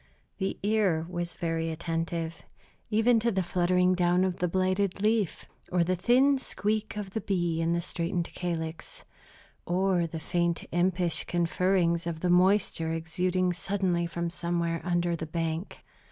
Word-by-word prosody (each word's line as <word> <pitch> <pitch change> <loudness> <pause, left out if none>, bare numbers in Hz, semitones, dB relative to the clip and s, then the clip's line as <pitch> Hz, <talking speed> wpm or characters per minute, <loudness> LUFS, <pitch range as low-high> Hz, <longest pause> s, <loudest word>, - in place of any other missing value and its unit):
The 190 -1 -1
ear 200 -6 +2
was 175 -1 -4
very 165 -2 -1
attentive 165 0 -3 0.5
even 225 +2 +4
to 235 +1 +1
the 190 -2 0
fluttering 180 +1 +2
down 180 0 +3
of 185 -1 -1
the 180 - +1
blighted 185 +2 0
leaf, 215 -4 +1 0.3
or 175 -1 +3
the 185 +2 0
thin 260 +8 +4
squeak 215 -2 -2
of 200 -2 -5
the 220 - -3
bee 175 -4 0
in 165 +1 +1
the 170 - 0
straitened 170 +1 -3
calyx, 165 -2 -5 0.6
or 180 -1 +1
the 160 0 -6
faint 170 +1 -1
impish 175 -2 +2
conferrings 170 0 +1
of 160 -1 -4
the 180 - +2
moisture 180 -3 +3
exuding 180 +3 0
suddenly 180 -1 -1
from 170 0 -3
somewhere 170 -1 -1
under 175 -1 0
the 160 -1 -5
bank. 165 +2 -3
175 Hz, 150 wpm, -28 LUFS, 170-190 Hz, 0.6 s, even